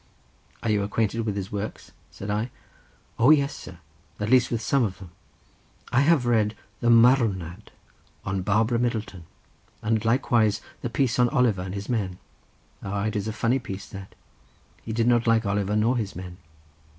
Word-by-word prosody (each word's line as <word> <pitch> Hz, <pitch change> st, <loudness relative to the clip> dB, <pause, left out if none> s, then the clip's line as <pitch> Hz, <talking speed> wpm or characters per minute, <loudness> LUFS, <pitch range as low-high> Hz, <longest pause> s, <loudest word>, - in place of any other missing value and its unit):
"Are 115 Hz, -, +1 dB
you 105 Hz, -1 st, +2 dB
acquainted 110 Hz, +2 st, -1 dB
with 105 Hz, -, -1 dB
his 100 Hz, -1 st, -4 dB
works?" 105 Hz, +1 st, -5 dB, 0.2 s
said 100 Hz, +1 st, -6 dB
I. 110 Hz, +4 st, -1 dB, 0.7 s
"O 120 Hz, +4 st, +5 dB
yes, 140 Hz, -2 st, +4 dB
sir, -, -, -10 dB, 0.4 s
at 105 Hz, +2 st, -2 dB
least 125 Hz, -1 st, +5 dB
with 115 Hz, -, -1 dB
some 135 Hz, +3 st, +1 dB
of 100 Hz, -4 st, -2 dB
them. 90 Hz, -3 st, -12 dB, 0.8 s
I 125 Hz, -, +3 dB
have 145 Hz, -3 st, +3 dB
read 110 Hz, -3 st, +2 dB, 0.2 s
the 120 Hz, -, +1 dB
Marwnad 115 Hz, -8 st, +3 dB, 0.6 s
on 95 Hz, 0 st, -1 dB
Barbara 110 Hz, +5 st, +1 dB
Middleton; 110 Hz, -7 st, -2 dB, 0.6 s
and 110 Hz, -1 st, +1 dB
likewise 115 Hz, -3 st, +2 dB, 0.2 s
the 120 Hz, -, -3 dB
piece 125 Hz, 0 st, 0 dB
on 125 Hz, -1 st, +4 dB
Oliver 125 Hz, -9 st, +2 dB
and 90 Hz, +1 st, -5 dB
his 100 Hz, 0 st, -5 dB
men. 100 Hz, -7 st, -2 dB, 0.6 s
Ah, 100 Hz, 0 st, -3 dB
it 110 Hz, -, -2 dB
is 105 Hz, 0 st, -2 dB
a -, -, -1 dB
funny 115 Hz, +4 st, +1 dB
piece 100 Hz, -5 st, -7 dB
that—he 95 Hz, -, -13 dB
did 115 Hz, +1 st, +1 dB
not 120 Hz, -1 st, +3 dB
like 115 Hz, -1 st, +3 dB
Oliver 100 Hz, +1 st, 0 dB
nor 115 Hz, +4 st, +2 dB
his 105 Hz, -4 st, -3 dB
men." 90 Hz, 0 st, -8 dB
110 Hz, 170 wpm, -25 LUFS, 100-120 Hz, 0.8 s, O